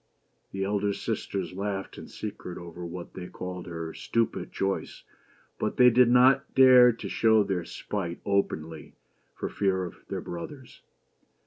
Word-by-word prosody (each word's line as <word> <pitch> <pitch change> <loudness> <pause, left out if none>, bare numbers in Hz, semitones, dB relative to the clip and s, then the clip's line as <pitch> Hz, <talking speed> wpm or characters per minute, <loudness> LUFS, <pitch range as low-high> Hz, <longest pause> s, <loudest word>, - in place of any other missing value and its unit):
The 95 0 -3
elder 100 +1 0
sisters 95 -2 -3
laughed 95 0 -4
in - - -9
secret 90 - -7
over 85 0 -9
what 85 +1 -7
they 90 -1 -7
called 90 0 -7
her 80 -1 -5
stupid 115 -1 -1
choice; 95 0 -3 0.6
but 105 - -2
they 125 -1 +7
did 125 +1 +5
not 130 +2 +4
dare 130 -2 +8
to 115 - -7
show 110 -1 +4
their 95 -4 -2
spite 90 -5 -5
openly 80 -6 -2 0.4
for - - -4
fear 95 -2 0
of 90 - -9
their - - -3
brothers. 125 - -8
95 Hz, 145 wpm, -27 LUFS, 90-115 Hz, 0.6 s, dare